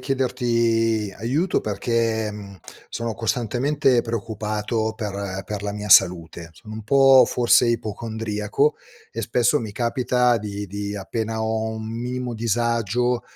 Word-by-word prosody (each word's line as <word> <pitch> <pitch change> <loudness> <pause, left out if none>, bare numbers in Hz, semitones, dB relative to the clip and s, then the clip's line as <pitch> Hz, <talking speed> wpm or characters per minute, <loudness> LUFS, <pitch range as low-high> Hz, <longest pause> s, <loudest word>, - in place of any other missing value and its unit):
chiederti 115 -5 0
aiuto 140 - 0
perché, 110 +1 -1
mhmm, 100 -2 -10 0.3
sono 115 -1 -4
costantemente 125 +4 +1
preoccupato 110 0 -2
per 100 -3 -4
per 105 0 -5
la 105 0 -3
mia 105 0 -6
salute. 85 -3 +4
Sono 105 +6 -11
un 110 - -7
po' 135 +3 +6
forse 120 0 +3
ipocondriaco, 110 +3 -1 0.3
e - - -5
spesso 125 +4 +2
mi 110 -5 -6
capita 125 +1 +1
di 100 -1 -5
di 100 +1 -5
appena 110 +3 -3
ho 110 0 -1
un 110 0 -6
minimo 125 +2 -4
disagio, 115 +1 0
115 Hz, 125 wpm, -23 LUFS, 105-120 Hz, 0.3 s, po